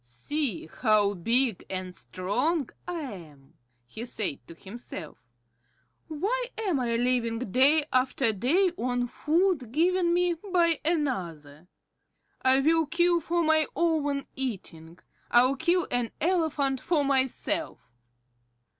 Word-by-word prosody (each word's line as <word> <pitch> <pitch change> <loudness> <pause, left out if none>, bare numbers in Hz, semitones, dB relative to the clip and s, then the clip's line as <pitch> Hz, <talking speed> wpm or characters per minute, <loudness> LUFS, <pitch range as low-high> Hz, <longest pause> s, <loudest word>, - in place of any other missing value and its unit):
"See 190 - -2
how 210 +2 +1
big 230 +4 +1
and 185 -1 -5
strong 200 - -2 0.2
I 350 -2 -3
am," 160 - -10 0.3
he 220 - -7
said 215 - -2
to 165 - -11
himself. 190 -4 -9 0.9
"Why 415 +11 -2
am 385 -10 0
I 235 -2 -1
living 240 -1 +1
day 265 +7 +3
after 255 -2 +2
day 330 - +2
on 245 0 0
food 310 - 0
given 345 +4 +2
me 355 0 +2
by 340 -2 +1
another? 180 - -3 0.7
I 260 +1 +4
will 320 +2 +2
kill 345 +2 +2
for 340 +2 -1
my 315 -1 +3
own 295 -5 0
eating. 180 -10 -5 0.3
I'll 250 +3 +4
kill 345 +5 +1
an 245 -2 0
elephant 300 -6 0
for 305 -5 +1
myself." 260 - -2
265 Hz, 120 wpm, -27 LUFS, 215-325 Hz, 0.9 s, I